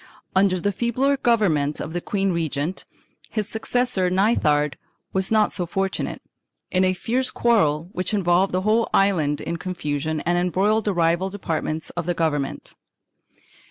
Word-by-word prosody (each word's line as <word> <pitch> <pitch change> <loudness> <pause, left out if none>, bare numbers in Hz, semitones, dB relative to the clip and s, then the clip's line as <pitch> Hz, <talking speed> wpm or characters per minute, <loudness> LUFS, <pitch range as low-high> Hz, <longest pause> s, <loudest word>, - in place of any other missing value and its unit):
2 - - -1
Under 190 -1 +3
the 205 +4 0
feebler 245 +7 +1
government 185 - +1
of 160 - -5
the 175 - -2
queen 195 0 0
regent, 165 0 -2 0.4
his 215 -3 -2
successor 220 -4 0
Nithard 155 -7 +2 0.4
was 190 0 +1
not 215 -1 +3
so 180 -3 -2
fortunate, 195 +3 -2 0.5
in 185 +1 +3
a 185 - +3
fierce 245 +7 -1
quarrel 165 -10 +2
which 185 -1 -3
involved 190 -2 +2
the 185 - 0
whole 220 +3 +2
island 160 -7 +2
in 170 - -3
confusion 155 -3 -3
and 175 +1 +1
embroiled 195 +5 +1
the 205 - +1
rival 170 +2 +2
departments 160 -5 -3
of 175 -1 -4
the 175 - 0
government. 145 -4 -2
185 Hz, 155 wpm, -23 LUFS, 165-205 Hz, 0.5 s, Under